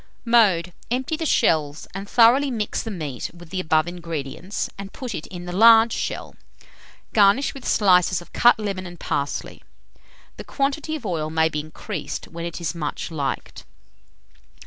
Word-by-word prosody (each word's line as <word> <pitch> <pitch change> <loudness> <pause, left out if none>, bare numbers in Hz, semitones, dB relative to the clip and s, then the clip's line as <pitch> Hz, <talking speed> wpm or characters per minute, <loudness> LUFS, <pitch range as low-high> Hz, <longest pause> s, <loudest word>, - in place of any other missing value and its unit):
Mode. 195 -7 +3 0.2
Empty 260 +6 -1
the 320 0 -2
shells, 155 - +1
and 195 +1 -7
thoroughly 245 +4 +5
mix 220 -5 -2
the 225 - -6
meat 155 - -5
with 170 -1 -14
the 190 - -2
above 155 -2 +2
ingredients, 170 +1 -4
and 195 0 -8
put 250 -4 -6
it 160 - -6
in 175 -1 -8
the 175 - -5
large 225 +3 +7
shell. - - -4 0.8
Garnish 210 +6 +4
with 270 -3 -8
slices 180 -3 +4
of 175 - -15
cut 240 0 +5
lemon 195 -4 -4
and 175 -1 -11
parsley. 140 0 -3 0.8
The - - -7
quantity 290 +3 -2
of 295 - -8
oil 160 -5 -2
may 160 0 +2
be 150 - -3
increased 155 +3 -6
when 170 0 -6
it 170 0 -5
is 170 - -2
much 160 -1 -4
liked. 145 -4 -4
185 Hz, 165 wpm, -23 LUFS, 165-230 Hz, 0.8 s, large